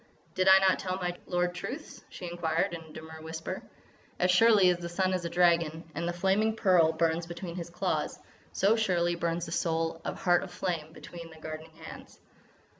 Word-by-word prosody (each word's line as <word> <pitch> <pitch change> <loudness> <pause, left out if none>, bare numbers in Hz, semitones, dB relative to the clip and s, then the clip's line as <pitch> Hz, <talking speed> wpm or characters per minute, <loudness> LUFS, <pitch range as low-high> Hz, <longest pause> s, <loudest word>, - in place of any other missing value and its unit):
"Did 185 0 +1
I 190 0 +9
not 190 -1 +3
tell 185 -1 -2
my 180 -2 -3
lord 180 0 0
truths?" 265 - -7
she 180 - -8
inquired 170 -1 -1
in 170 - -5
a 160 -1 -14
demure 160 0 -10
whisper. 160 0 -5 0.6
"As 180 0 +3
surely 200 -1 +6
as 175 - -2
the 170 0 -5
sun 185 +2 0
is 180 -2 -2
a - - -1
dragon, 170 -2 +2
and 170 +3 -3
the - - 0
flaming 195 +5 +1
pearl 180 -7 +4
burns 165 +1 0
between 175 0 -6
his 170 -1 -5
claws, 170 - -2 0.3
so 205 +3 +3
surely 180 -6 +1
burns 170 0 -2
the 165 - -8
soul 165 0 -1
of - - -4
Heart 175 -1 +4
of 190 - -7
Flame 165 -5 -3
between 170 0 -10
thy 160 - -14
guarding 155 0 -7
hands. 160 0 -12
175 Hz, 195 wpm, -29 LUFS, 165-185 Hz, 0.6 s, I